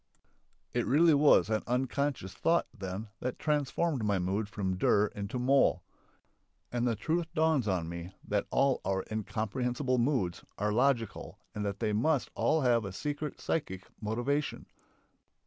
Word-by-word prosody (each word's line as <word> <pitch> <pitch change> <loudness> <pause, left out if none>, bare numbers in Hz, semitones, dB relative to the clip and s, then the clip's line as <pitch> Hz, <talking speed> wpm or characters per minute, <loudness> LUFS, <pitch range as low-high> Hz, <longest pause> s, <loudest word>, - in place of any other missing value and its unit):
It - - 0
really 160 +4 +5
was 145 0 +5
an 110 - +1
"unconscious" 130 -4 -1
thought, 170 +1 +2
then, 95 +3 -5
that 125 0 -3
transformed 150 -2 0
my 100 -2 +2
mood 95 +3 -1
from 95 -3 -2
dur 100 +3 +3
into 100 +4 -4
moll. 135 +3 +3 0.9
And 120 0 0
the 115 - +1
truth 160 - -1
dawns 155 -7 +2
on 90 -4 0
me 85 +1 -6 0.2
that 105 -1 0
all 135 -1 +2
our 95 0 0
"incomprehensible" 125 +4 -1
moods 120 -9 0
are 105 +1 0
logical 120 -1 0 0.2
and 105 - -3
that 100 - -4
they 105 - +1
must 135 +6 +1
all 160 0 +2
have 120 -3 +3
a 100 - -5
secret 145 +7 -4
psychic 95 - -2 0.2
motivation. 120 +7 -1
120 Hz, 145 wpm, -31 LUFS, 100-140 Hz, 0.9 s, really